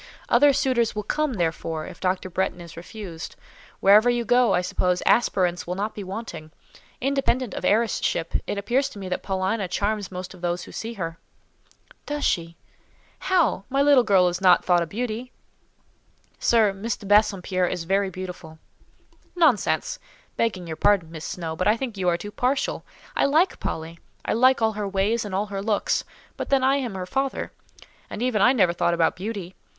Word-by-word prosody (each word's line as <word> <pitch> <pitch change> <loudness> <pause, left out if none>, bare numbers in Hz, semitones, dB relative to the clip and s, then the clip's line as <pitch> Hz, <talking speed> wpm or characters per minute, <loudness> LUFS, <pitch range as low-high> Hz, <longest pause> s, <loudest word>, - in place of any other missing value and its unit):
"Other 285 +4 +6
suitors 255 -5 +1
will 210 - -2
come, 305 +5 -1
therefore, 165 -4 -2
if - - -10
Dr. 185 0 -1
Bretton 190 0 -1
is 170 -1 -11
refused. 175 -1 -8 0.5
Wherever 210 +5 +6
you 240 -1 0
go, 245 +2 +4
I 180 - +2
suppose, 180 0 0
aspirants 180 -7 +2
will 180 - -2
not 210 +3 -3
be 205 - -6
wanting. 185 -5 -7 0.5
Independent 260 -3 0
of - - -5
heiress 220 0 +2
ship, 165 -1 -2
it - - -2
appears 260 +7 0
to - - -12
me 190 -2 -6
that 180 - -2
Paulina 190 +1 -1
charms 205 +2 -2
most 180 0 -6
of 180 - -15
those 175 0 -2
who - - -11
see 230 +1 -5
her." 165 -5 -5 0.9
"Does 295 0 -2
she? 170 -2 -1 0.6
How? 350 - +1
My 275 +1 +2
little 285 -3 +6
girl 195 -4 +4
is 175 +1 -2
not 180 -2 +5
thought 175 -1 +4
a 170 - -2
beauty." 235 +5 -4 1.1
"Sir, 220 -4 +3
Miss 205 +3 -3
de - - -12
Bassompierre 195 -3 +2
is 180 -2 -3
very 195 +3 +1
beautiful." 180 -3 -8 0.8
"Nonsense!—begging 230 - 0
your 160 -2 -6
pardon, 190 -4 +2
Miss 160 -2 -7
Snowe, 165 -3 -4
but 185 - -1
I 215 +2 +4
think 240 -3 -4
you 185 -2 +1
are 170 - +1
too 205 +4 -8
partial. 255 +5 -1 0.3
I - - +3
like 315 +7 +2
Polly: 165 +1 -5 0.3
I - - 0
like 255 +1 +4
all 220 - +3
her 210 -1 -3
ways 200 +4 0
and 195 -2 -4
all 200 +2 0
her 195 - -2
looks—but 210 0 -3
then 275 -1 +3
I 270 +1 +4
am 245 -7 -3
her 185 -1 -4
father; 270 +7 -2 0.6
and 235 - -4
even 240 -5 +1
I 245 - +6
never 190 -10 +3
thought 170 0 +1
about 165 -1 +2
beauty. 190 -2 -5
200 Hz, 185 wpm, -24 LUFS, 180-235 Hz, 1.1 s, Other